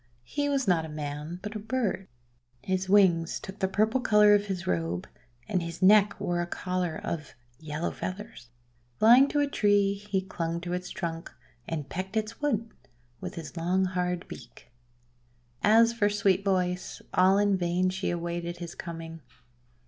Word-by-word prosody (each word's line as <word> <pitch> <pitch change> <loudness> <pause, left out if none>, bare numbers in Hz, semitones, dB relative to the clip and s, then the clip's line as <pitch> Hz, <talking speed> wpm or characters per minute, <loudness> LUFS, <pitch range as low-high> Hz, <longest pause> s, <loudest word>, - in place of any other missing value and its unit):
He 285 - -1
was 275 -4 0
not 175 -3 +3
a 160 - -7
man, 150 +3 -5
but 210 +1 -6
a - - -3
bird. 215 -4 -2 0.6
His 185 0 -1
wings 180 -5 +4
took 190 +2 -9
the 190 - +1
purple 215 +6 +1
colour 210 -3 +6
of 205 0 +2
his 185 -3 -3
robe, 85 0 -2 0.4
and 185 -4 0
his 170 +2 -5
neck 205 +1 +5
wore 175 -3 -1
a 175 - -3
collar 180 -2 -2
of 155 -3 -5 0.2
yellow 155 +1 -3
feathers. 190 - -7 0.5
Flying 245 +5 +7
to 290 0 +1
a 285 - +2
tree, 205 -6 +3
he 200 -1 -2
clung 170 -3 -3
to 175 0 -4
its 180 0 -4
trunk, 165 -2 -5 0.4
and 150 -4 -4
pecked 190 +7 -4
its 220 +3 -3
wood 230 -6 -1 0.5
with - - -6
his 160 -3 -8
long 180 +3 +1
hard 180 -1 -2
beak. - - -12 0.9
As 230 +2 +5
for 210 -3 +2
Sweet 200 -2 +2
Voice, 180 -2 -1
all 185 +2 +5
in 205 -1 +3
vain 180 0 +1
she 190 +1 -2
awaited 170 0 -3
his 175 -1 -7
coming. 165 -1 -8
185 Hz, 165 wpm, -28 LUFS, 170-205 Hz, 0.9 s, Flying